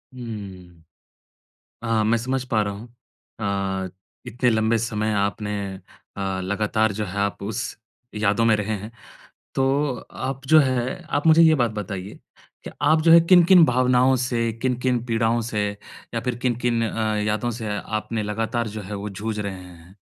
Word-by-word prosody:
हम्म। 95 -8 -9 1.0
हाँ, 110 -1 +1
मैं 115 +2 +2
समझ 130 +2 -2
पा 110 -2 +2
रहा 100 - -2
हूँ। 110 +4 -9 0.5
अ, 95 -2 -2 0.4
इतने 125 +1 +1
लंबे 110 0 +2
समय 110 -1 -1
आपने 100 +1 -1 0.7
अ, 95 -1 -2
लगातार 105 +2 0
जो 105 +1 -3
है 90 - -7
आप 100 0 -1
उस 105 0 -3 0.5
यादों 105 +2 +1
में 110 -1 +5
रहे 105 +1 -2
हैं। 105 +3 -8 0.6
तो 135 - +1 0.6
आप 135 0 -5
जो 155 0 +7
है 130 -2 -1 0.2
आप 145 - -4
मुझे 160 +1 +7
ये 160 -1 +6
बात 120 -5 +1
बताइए 95 -1 -6 0.5
कि - - -6
आप 160 0 +4
जो 165 0 +6
है 170 - +9
किन-किन 175 0 +7
भावनाओं 125 0 +3
से, 120 -2 -1
किन-किन 125 -1 0
पीड़ाओं 115 0 +1
से 105 -1 0 0.5
या 115 - 0
फिर 125 -1 -2
किन-किन 120 -1 +1
अ, 110 -1 -1
यादों 105 +3 0
से 105 -2 -3
आपने 110 +1 -3
लगातार 110 +2 -2
जो 105 +1 -6
है 105 +2 -7
वो 100 +1 -4
जूझ 105 +2 -4
रहे 100 -1 -3
हैं? 90 +1 -14
110 Hz, 165 wpm, -23 LUFS, 105-125 Hz, 1.0 s, है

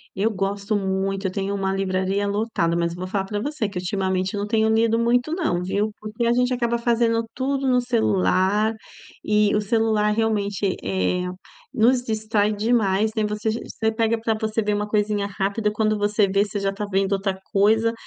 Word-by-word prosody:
Eu 215 +4 +1
gosto 200 +2 -2
muito, 195 0 -1
eu 185 - -3
tenho 195 +1 -2
uma 195 -1 -1
livraria 195 +1 -1
lotada, 200 -5 0
mas 170 0 0
eu - - -9
vou 185 +1 -5
falar 195 0 -2
para 205 +1 -3
você 265 -3 -2
que 195 - -7
ultimamente 185 +1 -1
eu 205 - -2
não 205 - -2
tenho 220 0 +2
lido 225 +1 +3
muito, 245 +5 +1
não 245 - -1
viu, 205 +4 -1
porque 215 +2 -3
a 235 - +3
gente 250 +1 +1
acaba 235 -1 0
fazendo 230 -1 +2
tudo 270 +1 -1
no 250 -1 +4
celular 215 -3 +2 0.5
e 210 0 +2
o 210 - +2
celular 215 0 +1
realmente, 205 -3 0
eh, 95 - 0 0.4
nos 245 +3 +3
distrai 215 -2 0
demais, 215 -1 +1
né, 220 - +1
você 210 +1 -1
você 220 0 -2
pega 225 0 0
para 225 0 0
você 220 0 -2
ver 210 0 0
uma 210 0 -1
coisinha 210 -1 0
rápida, 200 +2 -1
quando 215 0 +1
você 205 0 +2
vê, 195 +1 +2
você 205 0 -4
já 195 0 -1
tá 210 - -5
vendo 195 +1 +1
outra 195 -1 -1
coisa 220 +3 +3
210 Hz, 195 wpm, -23 LUFS, 195-225 Hz, 0.5 s, no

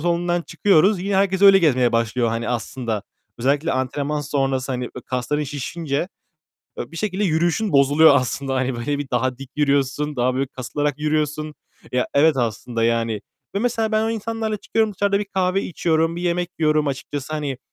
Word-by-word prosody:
salonundan 175 +1 0
çıkıyoruz. 195 +1 +3
Yine 200 0 0
herkes 195 0 +1
öyle 195 -1 +9
gezmeye 130 -9 +3
başlıyor, 115 +1 +1
hani 115 +1 -2
aslında. 115 -2 -3 0.4
Özellikle 140 +6 +1
antrenman 140 +3 -1
sonrası, 135 -2 -1
hani 125 -1 -3
ö - - -6
kasların 130 +4 -1
şişince, 145 +3 -3 0.7
e, - - -5
bir - - -9
şekilde 205 +2 -1
yürüyüşün 175 +5 +1
bozuluyor 145 +2 +6
aslında. 135 +1 -1
Hani 130 -1 0
böyle 140 +5 -2
bir 145 -2 -5
daha 125 +1 0
dik 135 -1 -10
yürüyorsun. 140 0 +1
Daha 125 +1 +1
böyle 135 +1 0
kasılarak 145 +3 -3
yürüyorsun. 150 0 -1 0.4
Ya, 125 0 +1
evet, 150 +1 +4
aslında, 115 -1 -1
yani, 115 -2 0 0.3
ve - - +1
mesela 225 -1 0
ben 215 0 +3
o 225 - 0
insanlarla 225 -1 -2
çıkıyorum. 220 +1 0
Dışarıda 200 +1 +1
bir 210 - -2
kahve 190 0 0
içiyorum. 165 -1 0
Bir 175 - -4
yemek 175 0 0
yiyorum 155 -1 +2
açıkçası. 140 +1 -4
Hani, 145 -4 -3
150 Hz, 175 wpm, -22 LUFS, 130-175 Hz, 0.7 s, öyle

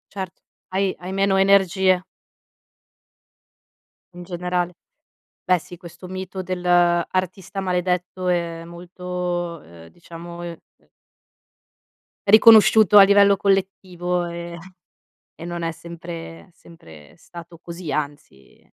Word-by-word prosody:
Certo, 190 -3 -6 0.3
hai 195 +1 +1
hai 180 +1 -6
meno 195 -1 +2
energie. 190 -1 +3 2.1
In 175 - -9
generale, 180 0 -3 0.7
beh 180 -1 +3
sì 175 +2 -12
questo 180 +1 -12
mito 190 0 -6
dell'artista 180 +1 0
maledetto 180 0 -2
è 170 -2 -2
molto, 175 -1 -5
uhm, 85 0 -15
diciamo, 170 - -11
ehm, 170 -1 -7 0.2
ehm - - -33 1.4
riconosciuto 215 -1 +7
a - - +10
livello 200 0 +5
collettivo, 185 -3 -1
ehm, 170 0 -7 0.8
e - - -11
non 175 0 -5
è 165 - -1
sempre 170 +1 -10
sempre 80 - -16
stato 170 -1 -13
così, 170 -3 -7
anzi, 145 - -6
175 Hz, 100 wpm, -22 LUFS, 170-185 Hz, 2.1 s, a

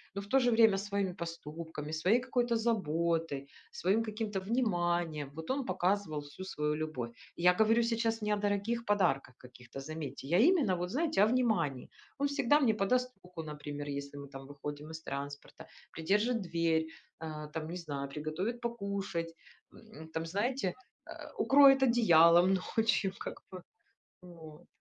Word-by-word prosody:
но 200 - -2
в - - -10
то 270 +6 +4
же 245 -2 +3
время 225 -3 +5
своими 200 -2 -2
поступками, 165 -3 -7
своей 185 +9 +3
какой-то 245 -1 0
заботой, 165 -9 0 0.2
своим 200 +5 +1
каким-то 215 -2 -3
вниманием, 175 - 0
вот 160 0 -8
он 270 0 -1
показывал 185 - 0
всю 145 +6 -9
свою 150 -4 -1
любовь. 155 -6 -4 0.3
Я 180 +1 +5
говорю 220 +4 +3
сейчас 230 -1 0
не 210 0 0
о - - +1
дорогих 205 +3 -1
подарках 175 - +1
каких-то, 125 +1 -12
заметьте, 150 -1 -6
я 170 +5 +3
именно 295 - +3
вот 180 +1 -3
знаете 305 -4 +2
о - - +5
внимании. 220 - 0 0.3
Он 285 - +1
всегда 285 0 +3
мне 250 -7 +3
подаст 250 +5 +1
руку, 180 -2 -8
например, 145 -1 -6
если 140 0 -5
мы 140 - -8
там 135 -1 -10
выходим 145 +1 -7
из 160 0 -7
транспорта, 140 -1 -7 0.3
придержит 210 +8 +1
дверь, 165 -3 +1 0.3
а, 155 -2 -6
там, 155 +1 -5
не 175 - -5
знаю, 140 -5 -5
приготовит 155 - -4
покушать, 200 -7 -3 0.4
м, 220 -8 -13
там, 160 0 -2
знаете, 205 +4 -1 0.3
а, - - -10
укроет 270 -1 +6
одеялом 175 -7 +6 0.2
ночью, 215 -4 +2
как - - -7
бы. 185 -1 -8 0.6
Вот. 165 -4 -13
180 Hz, 155 wpm, -32 LUFS, 155-225 Hz, 0.6 s, укроет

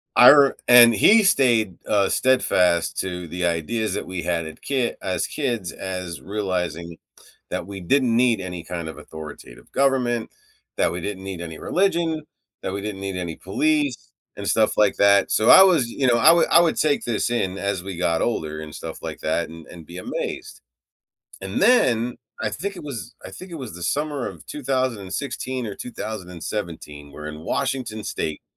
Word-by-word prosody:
I 125 - +10
r 140 -2 +5
and 120 -2 +8
he 215 - +6
stayed, 120 - +3
uh, 100 -2 +2
steadfast 90 -10 +2
to 90 -2 -4
the 90 +2 -3
ideas 85 +7 -1
that - - -3
we 90 -2 -5
had 85 -2 -1
at 80 - -11
kit 130 -4 -1
as 95 - -2
kids 120 -10 -3
as 90 -3 -6
realizing 90 -4 -3 0.5
that 85 - -3
we 100 -1 -7
didn't 120 +5 +2
need 120 -4 +3
any 90 -2 -6
kind 85 -1 -5
of - - -9
authoritative 75 -6 -11
government, 125 -4 +1 0.5
that - - +2
we 90 - -5
didn't 95 0 -5
need 95 -3 -6
any 80 -2 -7
religion, 170 -4 0 0.4
that 95 - -3
we 100 - -4
didn't 105 -1 -5
need 95 -1 -4
any 85 -3 -4
police 300 -1 -1 0.2
and - - -6
stuff - - +2
like - - +3
that, 100 -1 +4
so, 110 - +3
I 190 - +10
was, 170 -10 +4
y 115 - -9
you 135 - +3
know, 120 - +4
I 115 - +7
would 170 0 +4
I - - +7
would 165 -2 +2
take 150 -2 +1
this 120 0 -1
in 95 -6 -1
as 100 -2 -2
we 95 -3 -6
got 85 -2 0
older 80 -9 -2
and 75 -1 -8
stuff - - -8
like - - -6
that - - -1
and 80 0 -11
and 85 -2 -12
be 85 +3 -10
amazed. - - -5 0.8
And 95 0 -3
then, 125 - +3 0.3
I - - 0
think 200 +1 -5
it - - -8
was 120 -4 -7
I - - -8
think 185 -1 -11
it - - -5
was 130 - -7
the 90 - -9
summer 145 - -1
of 80 -5 -12
2016 130 -2 -3
or 105 - -5
2017 90 -9 -6
where 75 +2 -10
in 75 0 -7
Washington 115 - -3
state, 75 - -4
105 Hz, 185 wpm, -23 LUFS, 90-130 Hz, 0.8 s, I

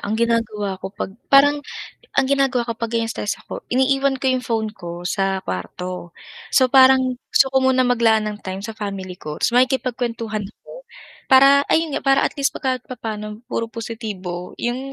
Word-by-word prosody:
ang 210 +2 -2
ginagawa 220 -4 -1
ko - - -5
'pag 195 - -4 0.2
parang 285 +1 +5 0.6
ang - - +4
ginagawa 270 -3 +1
ko - - 0
pag 230 0 -4
ganyang 230 -1 -1
stress 205 - -3
ako - - -8
iniiwan 270 +1 +2
ko 265 - -3
yung 255 -1 -1
phone 220 -2 -1
ko 175 -3 -8
sa 195 +1 -1
kwarto. 175 - -6 0.3
So 260 - +5
parang, 260 -1 +5
gusto 270 - +5
ko - - 0
muna 260 -1 +3
maglaan 225 -3 +3
ng 210 0 -4
time 190 0 -5
sa 225 - -5
family 195 -3 -5
ko 150 0 -6
ta's - - +1
makikipag-kwentuhan 240 -4 0
ako - - -14 0.5
para, 275 +1 +7
ayun 320 -2 +2
nga - - -1
para 270 0 +4
at - - 0
least 275 - +2
pag - - -11
kahit 255 -1 0
papaano 215 -2 -6
puro 230 0 -3
positibo 210 -6 -6
yung 240 +1 -2
230 Hz, 180 wpm, -21 LUFS, 205-260 Hz, 0.6 s, para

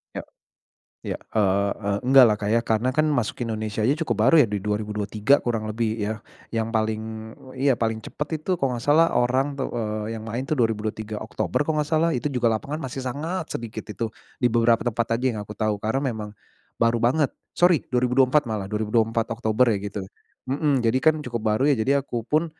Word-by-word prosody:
Iya - - -4 0.8
iya, - - -3 0.2
eee, 100 -1 +2 0.2
e - - 0 0.2
enggaklah, 125 -5 +7
Kak, 105 0 -2
ya. 115 - +4
Karena 115 +2 0
kan, 155 +1 +2
masuk 125 -6 -1
Indonesia 110 -2 -3
aja 130 +6 +3
cukup 120 -7 -1
baru 165 - +6
ya, - - -1
di 105 -1 -3
2023 105 +3 +1
kurang 115 -3 -1
lebih 110 +1 -1
ya, 110 +1 -3 0.3
yang 110 0 0
paling 110 0 -3 0.2
yang 135 0 +3
paling 110 -1 0
cepat, 150 - -5
itu, 155 - -6
kalau 130 -3 0
enggak 120 - -7
salah, 160 +3 +5
orang 130 +4 +1
tuh, 130 - -1 0.5
yang 115 - -5
main 120 +4 -3
tuh, - - -3
2023 110 -3 -1
Oktober 110 +3 -1
kalau 155 -1 +1
enggak 150 - -2
salah, 165 +1 +3
itu 125 +4 -1
juga 125 -3 0
lapangan 140 +7 -3
masih 135 +1 -5
sangat 155 +7 -3
sedikit, 115 -2 -5
itu, 115 +2 -3 0.3
di 125 - +2
beberapa 115 -1 +3
tempat 115 -1 0
aja, 125 - -5
yang 110 - -5
aku 105 0 -10
tahu, 105 -2 -1
karena 110 +5 0
memang 105 -1 -6 0.5
baru 115 0 +3
banget 130 +5 +2 0.2
sorry 175 -3 +4
2024, 125 +3 +3
malah 105 -3 -3
2024 110 +1 +1
Oktober 115 +2 +2
ya, - - -1
gitu 100 0 -4 0.4
mhm, 140 -1 +1
jadi 115 +3 +3
kan, 155 -1 +5
cukup 120 -2 -3
baru, 110 +4 +1
ya. - - +5
Jadi, 140 +5 +3
aku 125 -4 -4
pun, 155 +3 +2
115 Hz, 195 wpm, -24 LUFS, 110-135 Hz, 0.8 s, enggaklah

